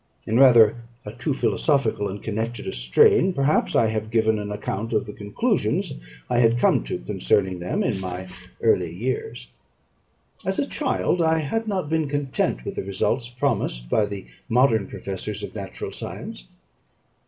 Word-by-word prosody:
In 115 +3 +1
rather 120 -4 +7 0.3
a 105 - -5
too 125 +5 -2
philosophical 135 -6 +1
and 100 +1 -7
connected 110 +2 -3
a - - -3
strain, 60 - +4
perhaps, 140 +1 +1
I 115 - +5
have 110 0 -3
given 110 -1 +2
an 105 0 -5
account 105 +2 -3
of - - +1
the 105 - -8
conclusions 100 -1 -1 0.3
I 120 - +1
had 115 0 +4
come 120 - +3
to - - -3
concerning 90 +10 0
them 90 +1 -1
in 110 -6 0
my 95 0 -5 0.4
early 90 -7 +3
years. 120 +5 -4 0.9
As 190 0 -1
a 280 - +1
child, 260 - 0
I 160 0 +3
had 220 +9 -2
not 190 -6 -1
been 160 -1 0
content 140 - -1
with - - -5
the - - -1
results 115 +5 -1
promised 120 - -2
by 105 -2 +3
the 100 -2 -7 0.2
modern 115 -4 +3
professors 100 +2 -6
of - - -6
natural 100 -3 -6
science. - - -7
110 Hz, 165 wpm, -24 LUFS, 100-135 Hz, 0.9 s, rather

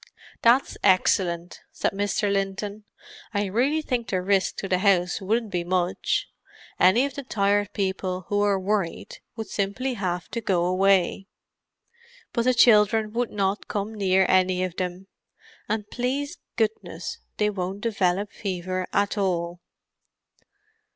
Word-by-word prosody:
"That's 240 +3 +3
excellent," 180 -2 +2
said - - -1
Mr. 205 0 0
Linton. 200 +2 -3 0.5
"I 205 0 +1
really 260 +11 +1
think 245 -6 -2
the 185 - 0
risk 190 +1 +1
to 195 - -4
the 185 -1 +1
house 185 -3 +2
wouldn't 220 +2 0
be 175 -2 -1
much. 180 0 0 0.5
Any 210 +9 +5
of 280 - -4
the 280 - -5
Tired 205 -4 +1
People 190 -2 -2
who 205 - 0
were 205 -1 +3
worried 190 -3 -2 0.2
would 220 -1 -4
simply 205 +7 -2
have 180 -6 -3
to 235 - -4
go 180 -5 +1
away. 190 +1 +2 1.1
But 235 - 0
the 255 0 +3
children 215 -2 +5
would 240 0 0
not 200 0 -1
come 205 +1 -3
near 190 -2 +3
any 185 0 +3
of 185 -1 -4
them; 180 +1 -3 0.6
and, 210 -1 -1
please 280 +6 -2 0.2
goodness, 200 -7 -2 0.2
they 210 0 +2
won't 190 0 -4
develop 200 -3 0
fever 185 -1 -3
at 205 +1 +1
all." 175 -2 -1
200 Hz, 140 wpm, -25 LUFS, 185-215 Hz, 1.1 s, Any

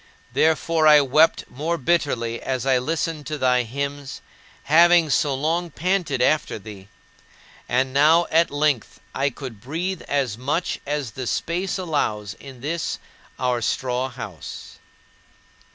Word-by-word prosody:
Therefore, 160 0 +2
I 150 -1 +8
wept 155 +4 +3
more 160 +6 -3
bitterly 125 -6 0
as 130 -1 -2
I 130 -2 +3
listened 155 +1 -3
to 150 - -3
thy 125 -2 +3
hymns, 140 +3 -5 0.4
having 170 +1 +5
so 140 +1 +2
long 165 +5 -1
panted 165 -5 0
after 155 -2 +1
thee. 100 -2 -11 0.8
And 130 +1 +1
now 155 +5 +5
at 165 +1 +4
length 145 -4 0
I 140 +1 +1
could 125 -5 -9
breathe 165 +8 -3
as 130 -6 -1
much 150 +7 -1
as 145 -5 -2
the 130 +2 -6
space 175 +8 -2
allows 110 - -2
in 135 -3 -12
this 165 +4 -2 0.4
our 125 -1 0
straw 125 +2 -1
house. 110 -10 -9
140 Hz, 135 wpm, -23 LUFS, 125-160 Hz, 0.8 s, I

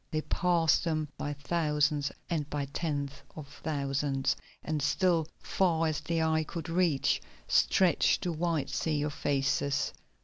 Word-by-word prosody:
They 155 -1 -1
passed 170 -2 +2
them 155 -3 -1
by 145 - -3
thousands 150 -1 0 0.2
and 155 -4 -2
by 145 -1 -2
tens 145 -4 -1 0.2
of 150 -3 -8
thousands, 140 -2 0 0.3
and 155 -1 -2
still, 165 +1 +2 0.2
far 165 -4 +2
as 155 -1 0
the 165 +2 0
eye 160 0 +2
could 165 +1 -6
reach, 165 -5 +2 0.3
stretched 185 -3 +3
the 175 - 0
white 165 -2 -1
sea 150 -2 0
of 150 -1 -2
faces. 140 0 0
155 Hz, 140 wpm, -30 LUFS, 145-165 Hz, 0.3 s, stretched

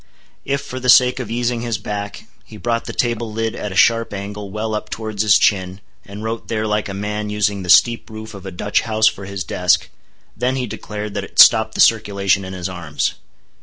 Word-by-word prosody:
If, 140 0 -1
for 130 - -7
the 125 0 -2
sake 125 +1 +6
of 120 -5 -5
easing 120 0 -1
his 115 -3 -2
back, 100 0 -6 0.2
he 110 - -13
brought 115 +2 -2
the - - -5
table 120 -2 -1
lid 115 +1 -2
at 105 - -5
a - - -7
sharp 115 +1 +3
angle 100 +1 -6
well 110 +2 -3
up 105 - -4
towards 110 -2 -4
his 105 -2 +5
chin, 95 -2 +1 0.2
and 100 +1 -9
wrote 115 +1 -4
there 110 -1 -2
like 105 -1 -1
a 100 - -5
man 105 +1 -3
using 105 -1 0
the 90 - -7
steep 120 +6 +4
roof 110 0 -9
of 100 -2 -10
a - - -6
Dutch 100 +4 0
house 110 -1 0
for 100 -2 +1
his 100 -1 -5
desk:—then 90 +8 -2
he 130 -1 -2
declared 105 -1 -6
that 100 -1 -3
it - - -12
stopped 110 -1 +7
the - - +2
circulation 100 -3 +3
in 95 0 -7
his 90 -2 -4
arms. 85 -5 -3
105 Hz, 215 wpm, -19 LUFS, 100-115 Hz, 0.2 s, stopped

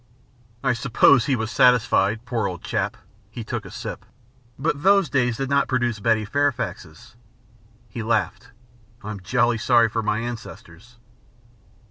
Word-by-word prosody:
"I 130 -2 +2
suppose 125 +1 +3
he 135 - +2
was 110 -1 -3
satisfied, 120 -3 +3
poor 115 -4 -1
old 90 -2 -7
chap." - - -2 0.3
He 115 +2 -7
took 110 -1 -5
a - - -9
sip. 120 +6 -7 0.5
"But 145 +1 -2
those 195 -4 +3
days 120 -3 +1
did 135 0 -3
not 140 0 +2
produce 120 -4 -1
Betty 110 0 +1
Fairfaxes." 120 - -3 0.7
He 115 +3 -7
laughed. 115 +2 -1 0.5
"I'm 105 -1 -6
jolly 120 +3 +1
sorry 115 -1 +3
for 115 +1 -2
my 105 0 -1
ancestors." 115 -2 -8
120 Hz, 140 wpm, -23 LUFS, 110-125 Hz, 0.7 s, suppose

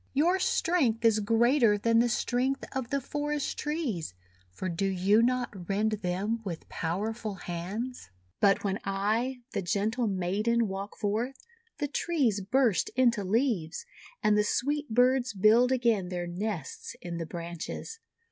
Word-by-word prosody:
Your 340 +7 +3
strength 270 -12 +1
is 220 -1 +5
greater 230 +1 +4
than 230 +2 +3
the 240 +1 +3
strength 250 +3 0
of 260 -3 -3
the 280 - 0
forest 295 +1 -2
trees, 255 - -2 0.4
for 140 - -5
do 185 +3 -1
you 195 +3 +3
not 240 -7 -1
rend 210 +2 +1
them 195 +5 -1
with 175 -6 -6
power 190 +7 -2
ful 220 -3 -5
hands? 190 - -5 0.3
"But 195 -1 +4
when 195 -1 -1
I, 220 +6 -1
the - - -1
gentle 215 +6 0
maiden, 210 +5 +1
walk 195 +1 -6
forth, 225 +6 -1 0.4
the 290 - -1
trees 275 - 0
burst 230 +1 +2
into 235 -5 +3
leaves, 205 - 0 0.4
and 210 - +4
the 210 - +4
sweet 290 +7 -1
birds 250 0 +3
build 225 +6 +5
again 230 -8 +2
their 175 -1 -3
nests 180 +1 -4
in 170 -1 -4
the 165 -1 -4
branches. 170 - -6
220 Hz, 145 wpm, -29 LUFS, 195-250 Hz, 0.4 s, is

